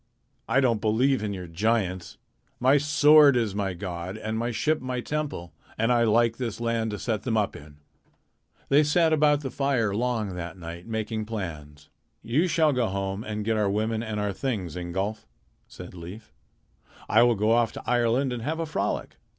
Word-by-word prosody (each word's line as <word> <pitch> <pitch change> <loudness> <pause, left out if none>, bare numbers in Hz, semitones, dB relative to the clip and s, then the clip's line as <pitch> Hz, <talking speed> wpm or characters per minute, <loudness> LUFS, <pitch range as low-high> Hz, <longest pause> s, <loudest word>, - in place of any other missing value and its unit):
I 130 +4 +3
don't 115 -5 +1
believe 120 +4 +2
in 105 -1 -2
your 95 -2 -6
giants. 95 0 -1 0.4
My 135 +3 +4
sword 145 -1 +6
is 115 -5 0
my 100 -2 -2
god, 90 +1 -5
and 110 0 -4
my 115 +2 -1
ship 150 +7 +1
is - - -13
my 130 -1 -3
temple, 145 - -4 0.2
and 115 +2 +1
I 120 -1 +3
like 115 +1 +3
this 115 -4 -4
land 115 -1 -1
to 105 - -4
set 110 -3 -2
them 115 -3 -1
up 105 -2 0
in." 75 0 -13 0.9
They 140 +2 +6
sat 160 +2 +3
about 150 -1 +3
the 135 -3 -5
fire 130 -7 0
long 110 -3 -1
that 85 -1 -6
night 85 +1 -9
making 110 -1 -3
plans. 75 -9 -7 0.3
"You 135 +11 +1
shall 160 -3 +3
go 125 -3 +1
home 95 +1 -3
and 105 -1 -4
get 110 0 +1
our 105 -2 +1
women 110 +2 -1
and 110 -2 -4
our 105 -1 -1
things, 95 - -3
Ingolf," 95 +5 -4 0.4
said 90 - -11
Leif. 90 +6 -10 0.7
"I 110 - +5
will 115 -3 +3
off 115 -1 +3
to - - -8
Ireland 125 +2 +1
and 120 - -5
have 155 +7 -3
a 165 - -1
frolic. 155 - -3
110 Hz, 185 wpm, -26 LUFS, 100-125 Hz, 0.9 s, sword